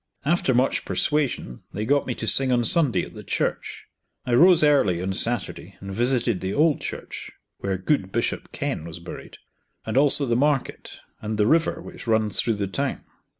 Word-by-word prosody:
After 150 -5 +1
much 130 +2 +1
persuasion 140 - -1
they 105 +2 -3
got 140 +3 +1
me 125 - -2
to - - -5
sing 130 +3 +5
on 120 -1 +2
Sunday 145 0 +3
at - - -10
the - - -10
church. - - -3 0.4
I 125 - -2
rose 170 +5 +6
early 135 - +3
on 95 +2 -3
Saturday 120 +2 -2
and 95 0 -8
visited 120 -2 0
the 95 +1 -3
old 155 0 +2
church - - -7 0.3
(where 95 -1 -2
good 95 0 -1
Bishop - - -3
Kenn 80 - -4
was 85 0 -7
buried), 85 - -10 0.5
and 110 +3 -2
also 140 0 +5
the 120 -2 0
market, 140 +1 -1 0.2
and 110 0 -4
the 105 - +2
river 160 +7 +1
which - - -11
runs 110 -3 +2
through 115 - -1
the 100 -1 -2
town. 135 +8 -3
120 Hz, 185 wpm, -23 LUFS, 100-140 Hz, 0.5 s, rose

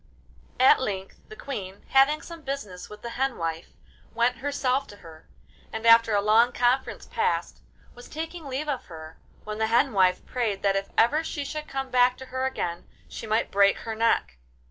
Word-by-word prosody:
At 260 +1 +6
length 195 -5 -4
the 435 - -10
Queen, 200 - -7
having 275 +3 +4
some 335 -1 -10
business 265 -11 -6
with 210 0 -12
the 235 - -5
hen 265 +1 -1
wife, 165 0 -3 0.5
went 240 +1 +2
herself 270 0 -1
to 205 - -12
her, 165 -5 -15 0.4
and, 220 +1 -5
after 230 -1 +6
a 200 - +2
long 230 +3 +4
conference 245 +2 0
passed, 460 -1 -1 0.3
was 245 - -13
taking 325 +1 -6
leave 275 +3 -4
of 280 -4 -3
her, 160 -2 -11 0.2
when 215 0 -6
the 220 - +1
hen 240 +3 +2
wife 185 -2 +2
prayed 220 -6 -2
that 195 -1 +2
if 195 0 -2
ever 295 +8 +4
she 290 -3 -4
should 305 +1 -5
come 270 -1 -4
back 250 0 +4
to 265 - -9
her 260 0 -3
again 175 -9 -4 0.2
she - - -8
might 220 +2 0
break 200 0 +4
her 225 - -5
neck. 220 - +1
235 Hz, 190 wpm, -26 LUFS, 200-270 Hz, 0.5 s, At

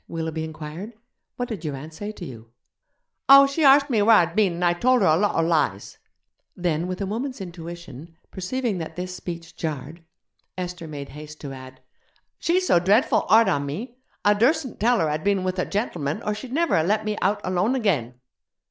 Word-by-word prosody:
Willoughby 160 -1 -4
inquired; 160 +7 -7 0.4
'what 245 - -3
did 210 -8 -6
your 150 -3 -3
aunt 155 +4 -9
say 205 +6 -6
to 200 -4 -9
you?' 115 -5 -11 0.8
'Oh, 275 0 +10
she 275 +3 -1
arst 280 0 +7
me 220 -3 +3
where 225 +2 +6
I'd 170 -3 +3
been, 205 -5 +3
and 175 +1 -1
I 175 - +4
tolder 245 +3 +3
a 155 - +5
lotter 165 -3 +1
lies.' 155 - -1 0.6
Then, 175 -1 -1
with 185 +1 -4
a - - 0
woman's 245 +6 -4
intuition, 170 -4 -9 0.2
perceiving 210 +2 -2
that 160 - -6
this 180 0 -5
speech 170 -2 -8
jarred, 155 +1 -5 0.5
Esther 180 -2 -5
made 145 -2 -7
haste 150 +1 -10
to 140 -2 -6
add, 130 0 -11 0.6
'She's 365 +2 +1
so 175 - +4
dreadful 205 - +2
hard 225 0 +6
on 145 -6 0
me. 235 - -6 0.3
I 205 - +6
dursn't 260 +6 +1
tell 240 +3 +3
her 160 - +2
I'd 155 +1 -2
been 200 -2 +1
with 185 0 -2
a - - +1
gentleman 170 - -2
or 210 - -1
she'd 225 +4 -8
never 330 +5 +1
have 160 +1 +1
let 215 +2 +1
me 215 0 -1
out 205 +3 +1
alone 185 +7 +1
again.' 155 - 0
180 Hz, 195 wpm, -24 LUFS, 160-220 Hz, 0.8 s, Oh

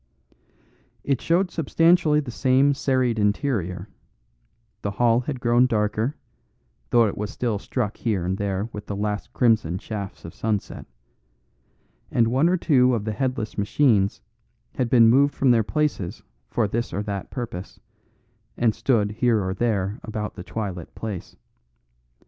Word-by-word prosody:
It 135 -3 0
showed 175 +3 +1
substantially 165 -1 +3
the 135 -4 -7
same 135 +3 +3
serried 130 -4 0
interior; 105 - -1 0.9
the 100 - -2
hall 115 +3 +2
had 130 +1 -4
grown 120 +1 +3
darker, 110 +3 0 0.7
though 120 -1 +5
it 100 - -2
was 105 0 -4
still 115 -5 -2
struck 105 +1 -3
here 100 -7 -1
and 95 +1 0
there 100 +1 -1
with 105 - -7
the 100 - -3
last 105 0 -3
crimson 110 -8 +2
shafts 100 -1 -7
of 85 - -8
sunset, 105 -3 -3 1.2
and 115 -2 +2
one 135 +8 +3
or 185 - +2
two 130 -7 +3
of 105 -3 -3
the 110 - -1
headless 125 -3 -2
machines 105 -2 +2 0.5
had 125 -3 -1
been 115 -2 +6
moved 140 +5 +4
from 135 -2 +3
their 115 -2 +4
places 145 - -2 0.3
for 115 -3 +1
this 115 +4 -2
or 100 +4 -2
that 100 -2 -5
purpose, 110 -7 -6 0.8
and 115 -2 +2
stood 110 -2 +1
here 110 -3 +1
and 95 +1 -4
there 105 -3 0
about 105 -1 -5
the 90 - -8
twilit 95 -5 -5
place. 105 -5 -6
115 Hz, 150 wpm, -24 LUFS, 100-130 Hz, 1.2 s, been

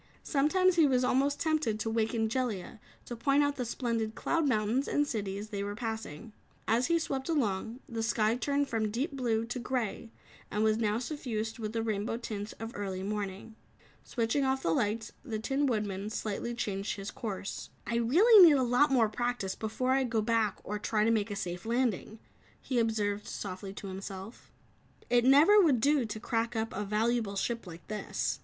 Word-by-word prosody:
Sometimes 350 +6 +2
he 320 -3 +6
was 255 -2 +2
almost 275 +3 +2
tempted 310 -9 0
to 220 - -2
waken 225 0 +1
Jellia 225 -4 -3 0.3
to 240 - -6
point 275 +5 +3
out 285 0 0
the 250 - -2
splendid 230 -2 -2
cloud 330 -3 0
mountains 230 +2 +1
and 290 - +2
cities 205 -5 -4
they 200 -2 -3
were 205 0 -4
passing. 220 -3 -5 0.3
As 235 +3 +2
he 335 0 +3
swept 275 -3 -3
along, 235 -4 -1
the 230 -2 -4
sky 225 0 +2
turned 280 +3 0
from 225 -4 -1
deep 250 +9 -2
blue 235 -5 0
to 245 +2 -4
grey 235 -3 -3 0.4
and 210 +1 0
was 220 0 +2
now 215 -1 +1
suffused 235 -4 -4
with 215 -1 -4
the 225 -1 -1
rainbow 215 0 -1
tints 215 -3 -5
of 225 +1 -7
early 190 -2 -4
morning. 205 +1 -4 0.5
Switching 235 +3 0
off 265 0 0
the 165 - +2
lights, 215 +5 -1
the 230 -7 -3
Tin 270 +6 0
Woodman 210 -4 -2
slightly 220 +2 -3
changed 200 -4 -2
his 195 0 -6
course. 200 -3 -5 0.2
"I 235 - -1
really 370 - +7
need 315 -5 +8
a 260 - +2
lot 250 +4 +4
more 240 -4 +4
practice 240 -3 -2
before 225 +4 -2
I 265 0 +3
go 225 -3 0
back 225 -2 +1
or 210 +1 -4
try 210 0 +1
to 225 - +3
make 220 -1 +1
a 205 - -3
safe 175 -2 -4
landing," 230 -2 -1 0.4
he 255 -3 -1
observed 210 -2 0
softly 190 0 -6
to 200 - -9
himself. 195 +3 -8 0.6
"It 240 0 +4
never 310 +11 +7
would 290 -9 +4
do 280 +1 +3
to 215 0 -5
crack 230 +1 -1
up 225 0 -2
a 205 - -2
valuable 220 0 0
ship 230 +1 -2
like 170 -1 -11
this." 215 0 -2
225 Hz, 190 wpm, -30 LUFS, 210-255 Hz, 0.6 s, need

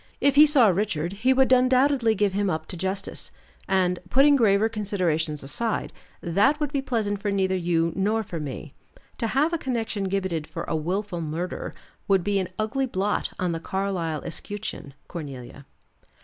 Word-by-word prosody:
If 280 - +3
he 300 +2 +8
saw 270 -7 +5
Richard, 180 -3 -1
he 225 +6 +1
would 265 0 +3
undoubtedly 255 -2 +3
give 205 -1 +1
him 200 0 0
up 160 -2 -2
to - - -5
justice, 190 +3 -4 0.4
and 185 -2 +1
putting 280 +5 +5
graver 215 -4 +4
considerations 180 -9 -1
aside 220 +11 -2 0.3
that 205 - +2
would 295 -1 -2
be 280 - +1
pleasant 215 -6 -1
for 205 - -1
neither 190 -1 +1
you 170 -2 +1
nor 215 +3 +1
for 175 -5 -6
me. 145 0 -6 0.5
To 230 - 0
have 290 +8 +1
a 335 - 0
connection 225 -6 -2
gibbeted 185 -5 -2
for 165 +2 -5
a - - -2
willful 180 +3 -2
murder 165 +3 -4 0.3
would 195 -3 +3
be 205 0 +1
an 185 - -3
ugly 230 +5 -1
blot 205 -2 -1
on 180 -2 -1
the 165 - -3
Carlyle 175 -4 -2
escutcheon, 170 -4 -6
Cornelia." 140 -4 -8
195 Hz, 170 wpm, -25 LUFS, 170-230 Hz, 0.5 s, he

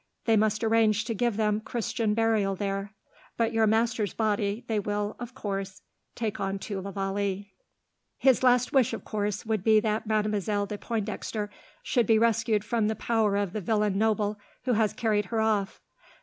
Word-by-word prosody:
They 225 - +4
must 215 0 +2
arrange 220 -1 +3
to 230 - -2
give 235 0 0
them 210 -1 +1
Christian 225 -2 -1
burial 220 -4 +2
there, 195 +1 -3 0.4
but 230 0 +1
your 225 -1 +3
master's 225 -2 +1
body 210 +1 0
they 220 -2 0
will, 205 +1 -2
of 245 +1 -7
course, 195 -5 -4 0.3
take 225 -3 -3
on 195 0 -1
to 195 0 -5
la 200 - -6
Vallee. 195 0 -3 0.6
"His 265 -4 +4
last 250 -1 +3
wish, 265 -4 +3
of - - -6
course, 210 -1 -2
would 215 -4 -1
be 220 0 +5
that 215 0 -1
Mademoiselle 210 -1 0
de 205 0 -6
Pointdexter 215 -1 -3 0.3
should 240 -5 +1
be 225 - +5
rescued 225 -2 +2
from 225 -2 0
the 220 - 0
power 220 -4 +1
of 200 -3 -1
the 215 - -3
villain 210 0 +1
noble 210 0 +1 0.2
who 250 -1 +1
has 215 -2 +2
carried 210 -3 0
her 225 +3 -2
off. 215 -2 0
215 Hz, 175 wpm, -27 LUFS, 205-225 Hz, 0.6 s, be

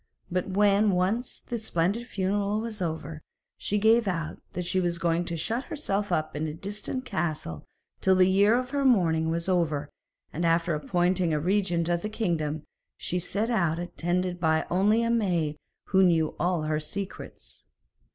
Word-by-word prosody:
But 180 +2 -1
when 205 +2 +4
once 195 +7 0
the 235 - -5
splendid 210 +3 0
funeral 200 0 0
was 220 -3 -4
over, 160 -2 -4 0.3
she 205 - -1
gave 225 +2 +4
out 165 -4 -3
that 180 0 -3
she 185 +2 +1
was 175 -1 0
going 170 0 0
to 170 -1 -3
shut 230 - -2
herself 205 -9 -2
up 155 -1 -1
in 155 +2 -2
a 150 - -5
distant 210 +8 -4
castle 155 - -3 0.3
till 190 0 +4
the 185 0 +5
year 200 +4 +4
of 250 0 -3
her 285 -1 0
mourning 165 -11 +3
was 170 +1 -1
over, 155 -6 0 0.4
and 165 - -2
after 170 0 +2
appointing 175 +2 +1
a - - +1
regent 175 -1 +1
of 175 0 +1
the 215 - -3
kingdom, 160 -8 -1 0.3
she 180 - -2
set 210 +6 -2
out 170 -8 +1
attended 175 +1 -2 0.3
only 205 +5 +3
by - - +1
a 230 - +1
maid 175 -10 +1 0.3
who 190 -1 +4
knew 165 -4 +3
all 175 -1 +1
her 155 0 0
secrets. 155 - -7
180 Hz, 170 wpm, -27 LUFS, 165-205 Hz, 0.4 s, the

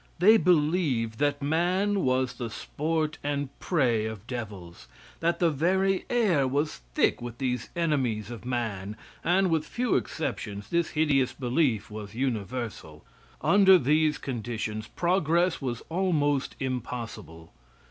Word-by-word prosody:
They 215 +6 +7
believed 150 - +1
that 145 -1 +1
man 180 +7 +1
was 130 -4 +1
the 120 -1 -5
sport 155 +6 -2
and 145 -1 -1
prey 120 - +1
of 110 -2 -7
devils; 100 - -7 0.3
that 170 +1 +1
the 170 -2 +3
very 190 +6 +1
air 195 - +2
was 145 +4 -1 0.2
thick - - +2
with 120 -1 -6
these 125 -2 -2
enemies 130 - 0
of 115 - -8
man, 110 -5 -3 0.3
and, 185 +1 +3
with 160 -2 +2
few 240 +9 -1
exceptions, 100 -2 -3
this 170 -1 +1
hideous 140 -5 +2
belief 125 -5 0
was 105 0 -8
universal. 115 - -4 0.4
Under 195 -2 +6
these 155 +1 +2
conditions 110 -3 -4
progress 175 -1 +1
was 120 -4 -3
almost 155 -6 0
impossible. 115 - -5
135 Hz, 125 wpm, -27 LUFS, 115-165 Hz, 0.4 s, They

